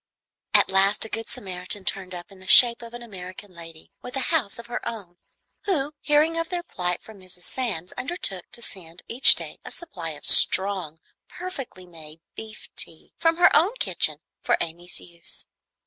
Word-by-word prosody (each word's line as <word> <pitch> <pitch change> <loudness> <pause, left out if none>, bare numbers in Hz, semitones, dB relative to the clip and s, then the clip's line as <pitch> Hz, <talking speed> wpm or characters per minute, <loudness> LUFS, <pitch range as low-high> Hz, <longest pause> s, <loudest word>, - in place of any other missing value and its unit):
At - - +6
last 195 +3 +3
a - - -7
good 225 +1 -5
Samaritan 185 +1 -2
turned 185 -2 -2
up 175 +4 -10
in 195 - -16
the 185 - -12
shape 240 -1 +8
of 235 0 -10
an 240 - -9
American 185 -2 -10
lady 165 -2 -13
with 250 - -8
a 270 +5 -1
house 245 -11 +1
of 235 - -10
her 240 +1 -6
own, 200 -7 -8 0.5
who, 300 -7 -1
hearing 305 +3 +2
of 330 - -3
their 355 -1 -3
plight 180 - -4
from 220 -2 -14
Mrs. 180 -1 -11
Sands, 200 -10 -4
undertook 250 - -3
to 235 - -6
send 175 -5 -9
each 245 +3 +8
day - - -7
a - - -8
supply 190 - -7
of - - -11
strong, 190 -5 +4 0.3
perfectly 275 - -8
made 160 -2 -13
beef 220 -1 -9
tea, - - -7
from 330 0 +2
her 350 - +5
own 380 +9 +3
kitchen, - - +2 0.2
for - - +1
Amy's 175 +2 -3
use. 170 -1 -11
200 Hz, 180 wpm, -24 LUFS, 180-255 Hz, 0.5 s, shape